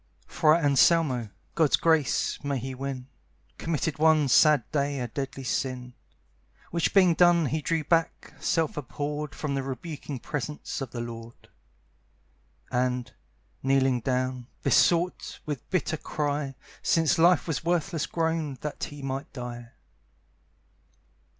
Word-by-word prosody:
Friar 155 Hz, 0 st, +3 dB
Anselmo 140 Hz, -4 st, +3 dB, 0.2 s
(God's 160 Hz, -4 st, +4 dB
grace 160 Hz, -5 st, +1 dB
may 140 Hz, -1 st, -1 dB
he 130 Hz, +2 st, -5 dB
win!) 130 Hz, -1 st, -5 dB, 0.5 s
Committed 160 Hz, -2 st, -2 dB
one 155 Hz, -2 st, +4 dB
sad 150 Hz, 0 st, +6 dB
day 140 Hz, -2 st, 0 dB
a 125 Hz, -, -2 dB
deadly 135 Hz, +2 st, -5 dB
sin; 125 Hz, 0 st, -2 dB, 0.8 s
Which 170 Hz, -1 st, +1 dB
being 185 Hz, -4 st, +5 dB
done 175 Hz, -1 st, +5 dB
he 155 Hz, +3 st, -1 dB
drew 165 Hz, +1 st, 0 dB
back, 165 Hz, +2 st, 0 dB
self 160 Hz, -3 st, 0 dB
abhorred, 150 Hz, +2 st, -4 dB
From 150 Hz, -2 st, -3 dB
the 135 Hz, -, 0 dB
rebuking 140 Hz, +2 st, -6 dB
presence 150 Hz, +3 st, -5 dB
of 135 Hz, -, -4 dB
the 120 Hz, 0 st, -5 dB
Lord, 115 Hz, 0 st, -9 dB, 1.2 s
And, 125 Hz, -1 st, -1 dB, 0.5 s
kneeling 135 Hz, -1 st, +2 dB
down, 130 Hz, 0 st, -2 dB, 0.2 s
besought, 175 Hz, +1 st, +2 dB
with 145 Hz, -5 st, -5 dB
bitter 165 Hz, -3 st, 0 dB
cry, 145 Hz, -2 st, -2 dB, 0.3 s
Since 165 Hz, -1 st, +2 dB
life 175 Hz, 0 st, +5 dB
was 160 Hz, -, -2 dB
worthless 165 Hz, -2 st, 0 dB
grown, 160 Hz, -4 st, -1 dB
that 150 Hz, -, -4 dB
he 145 Hz, -1 st, -10 dB
might 135 Hz, 0 st, -4 dB
die. 120 Hz, -2 st, -7 dB
145 Hz, 125 wpm, -27 LUFS, 130-160 Hz, 1.2 s, sad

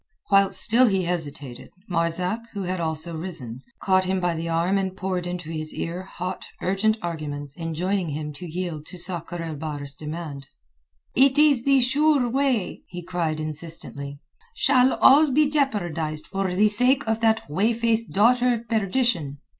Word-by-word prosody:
Whilst 195 Hz, -1 st, +4 dB
still 240 Hz, +3 st, +6 dB
he 195 Hz, -3 st, +1 dB
hesitated, 150 Hz, -7 st, -5 dB, 0.2 s
Marzak, 180 Hz, +4 st, 0 dB
who 200 Hz, -2 st, -4 dB
had 185 Hz, 0 st, -3 dB
also 160 Hz, 0 st, -3 dB
risen, 155 Hz, -8 st, -6 dB, 0.2 s
caught 185 Hz, -1 st, +3 dB
him 190 Hz, 0 st, 0 dB
by 175 Hz, -1 st, 0 dB
the 165 Hz, +1 st, -4 dB
arm 170 Hz, +4 st, +1 dB
and 190 Hz, -1 st, -3 dB
poured 185 Hz, -2 st, -2 dB
into 175 Hz, -2 st, -5 dB
his 155 Hz, -1 st, -5 dB
ear 170 Hz, +2 st, -4 dB
hot, 185 Hz, -1 st, -6 dB
urgent 200 Hz, +4 st, +1 dB
arguments 145 Hz, -4 st, -5 dB
enjoining 175 Hz, +2 st, -2 dB
him 150 Hz, 0 st, -4 dB
to 175 Hz, +5 st, -8 dB
yield 170 Hz, -3 st, -4 dB
to 180 Hz, -, -9 dB
Sakr 175 Hz, -1 st, -2 dB
el 160 Hz, -2 st, -5 dB
Bahr's 145 Hz, -2 st, -5 dB
demand. 150 Hz, -2 st, -7 dB, 0.7 s
"It 270 Hz, +1 st, +4 dB
is 290 Hz, -5 st, +4 dB
the 275 Hz, -1 st, +5 dB
sure 280 Hz, +1 st, +3 dB
way," 250 Hz, -6 st, 0 dB
he 175 Hz, -1 st, -8 dB
cried 170 Hz, -3 st, -2 dB
insistently. 155 Hz, -2 st, -5 dB, 0.4 s
"Shall 265 Hz, -, +4 dB
all 295 Hz, +3 st, +6 dB
be 295 Hz, +3 st, +3 dB
jeopardized 175 Hz, -, -1 dB
for 195 Hz, -1 st, -2 dB
the 210 Hz, +3 st, +4 dB
sake 250 Hz, +5 st, +3 dB
of 220 Hz, 0 st, 0 dB
that 225 Hz, -1 st, +1 dB
whey 195 Hz, +10 st, +1 dB
faced 230 Hz, -1 st, 0 dB
daughter 245 Hz, +4 st, +4 dB
of 230 Hz, 0 st, -8 dB
perdition? 210 Hz, -, 0 dB
180 Hz, 160 wpm, -24 LUFS, 160-225 Hz, 0.7 s, still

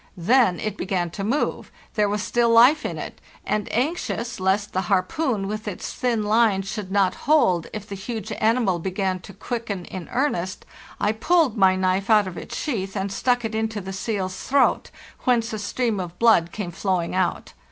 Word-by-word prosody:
Then 190 Hz, +1 st, +3 dB
it 215 Hz, -1 st, -3 dB
began 180 Hz, -2 st, -1 dB
to 195 Hz, -, -5 dB
move; 240 Hz, +9 st, -1 dB, 0.2 s
there 210 Hz, -1 st, +2 dB
was 210 Hz, -1 st, -1 dB
still 240 Hz, -1 st, +2 dB
life 245 Hz, +7 st, +6 dB
in -, -, -5 dB
it; -, -, -7 dB, 0.2 s
and, 210 Hz, 0 st, -1 dB
anxious 250 Hz, -, -2 dB
lest 190 Hz, +2 st, 0 dB
the 185 Hz, -, +1 dB
harpoon 200 Hz, +3 st, 0 dB
with. 215 Hz, +1 st, -5 dB
its 200 Hz, -, -5 dB
thin 235 Hz, -4 st, 0 dB
line 210 Hz, -2 st, +3 dB
should 200 Hz, -1 st, -5 dB
not 195 Hz, -2 st, +3 dB, 0.2 s
hold 185 Hz, -, +4 dB
if 210 Hz, -1 st, -7 dB
the 200 Hz, -, -7 dB
huge 220 Hz, +2 st, -5 dB
animal 220 Hz, -5 st, +2 dB
began 190 Hz, +1 st, -2 dB
to 185 Hz, -, -12 dB
quicken 200 Hz, -2 st, -4 dB
in 185 Hz, -3 st, -8 dB
earnest, 190 Hz, -9 st, -1 dB, 0.3 s
I 210 Hz, -, +2 dB
pulled 295 Hz, +3 st, +2 dB
my 190 Hz, -3 st, +4 dB
knife 185 Hz, +2 st, 0 dB
out 210 Hz, -2 st, +5 dB
of 185 Hz, -2 st, -6 dB
its -, -, -7 dB
sheath 195 Hz, -9 st, -3 dB
and 195 Hz, 0 st, -2 dB
stuck 245 Hz, +3 st, +1 dB
it 220 Hz, -, -3 dB
into 220 Hz, -1 st, -1 dB
the 190 Hz, 0 st, -6 dB
seal's 190 Hz, -2 st, -3 dB
throat, 275 Hz, 0 st, +2 dB, 0.4 s
whence 235 Hz, -2 st, +2 dB
a 215 Hz, -, -3 dB
stream 215 Hz, +1 st, -1 dB
of 180 Hz, -1 st, -6 dB
blood 220 Hz, -8 st, +4 dB
came 200 Hz, -5 st, -5 dB
flowing 180 Hz, -1 st, -1 dB
out. 185 Hz, -1 st, -1 dB
205 Hz, 185 wpm, -23 LUFS, 190-230 Hz, 0.4 s, life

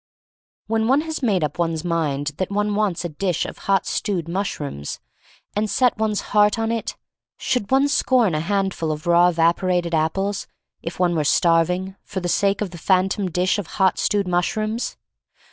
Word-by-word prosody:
When 225 Hz, 0 st, 0 dB
one 270 Hz, +4 st, +4 dB
has 320 Hz, -1 st, -5 dB
made 200 Hz, -, +1 dB
up 150 Hz, +3 st, -3 dB
one's 165 Hz, -2 st, 0 dB
mind 150 Hz, -4 st, -1 dB
that 185 Hz, -, -2 dB
one 210 Hz, +1 st, 0 dB
wants 205 Hz, -5 st, 0 dB
a -, -, -2 dB
dish 175 Hz, +2 st, -1 dB
of -, -, -8 dB
hot 195 Hz, -2 st, +3 dB
stewed 185 Hz, -7 st, -2 dB
mushrooms, 155 Hz, -, -4 dB, 0.6 s
and 210 Hz, +1 st, 0 dB
set 250 Hz, +2 st, +2 dB
one's 215 Hz, -2 st, 0 dB
heart 210 Hz, 0 st, +4 dB
on 225 Hz, 0 st, 0 dB
it, 230 Hz, -1 st, -3 dB, 0.4 s
should 245 Hz, -6 st, -1 dB
one 270 Hz, +2 st, +4 dB
scorn 255 Hz, -, +2 dB
a 155 Hz, -, 0 dB
handful 190 Hz, -2 st, -1 dB
'of 155 Hz, +2 st, -5 dB
raw 175 Hz, +1 st, +5 dB
evaporated 175 Hz, +1 st, +1 dB
apples, 195 Hz, +6 st, 0 dB, 0.3 s
if 165 Hz, -, -6 dB
one 180 Hz, -1 st, +2 dB
were 155 Hz, -, +1 dB
starving, 180 Hz, +4 st, +2 dB
for 190 Hz, -, -5 dB
the 175 Hz, -, -3 dB
sake 200 Hz, +3 st, +1 dB
of 200 Hz, -4 st, -2 dB
the 170 Hz, -, -9 dB
phantom 190 Hz, +2 st, +1 dB
dish 180 Hz, +4 st, +1 dB
of 195 Hz, -, -5 dB
hot 190 Hz, -2 st, +3 dB
stewed 205 Hz, -2 st, +1 dB
mushrooms? 215 Hz, +6 st, -1 dB
190 Hz, 180 wpm, -22 LUFS, 170-210 Hz, 0.6 s, raw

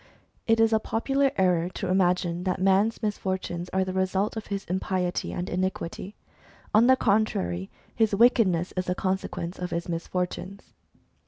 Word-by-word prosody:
It 225 Hz, 0 st, +3 dB
is 225 Hz, 0 st, +4 dB
a 220 Hz, -, +4 dB
popular 270 Hz, +6 st, +1 dB
error 180 Hz, -2 st, +2 dB
to -, -, -3 dB
imagine 180 Hz, -1 st, +1 dB
that 185 Hz, -1 st, -1 dB
man's 195 Hz, +5 st, +2 dB
misfortunes 185 Hz, -4 st, -3 dB
are 190 Hz, 0 st, 0 dB
the 185 Hz, -, -4 dB
result 190 Hz, +3 st, 0 dB
of 220 Hz, -, -6 dB
his 200 Hz, -1 st, -4 dB
impiety 185 Hz, 0 st, -2 dB
and 175 Hz, +1 st, -4 dB
iniquity. 185 Hz, +1 st, -3 dB, 0.6 s
On 220 Hz, +3 st, +6 dB
the 260 Hz, -, +7 dB
contrary, 100 Hz, -, 0 dB, 0.2 s
his 220 Hz, -3 st, +2 dB
wickedness 200 Hz, -6 st, +3 dB
is 185 Hz, 0 st, -1 dB
the 180 Hz, -, -1 dB
consequence 185 Hz, -2 st, -3 dB
of 180 Hz, 0 st, -3 dB
his 170 Hz, -1 st, -3 dB
mis 170 Hz, -1 st, -4 dB
fortunes. 185 Hz, +2 st, -4 dB
190 Hz, 160 wpm, -26 LUFS, 180-210 Hz, 0.6 s, the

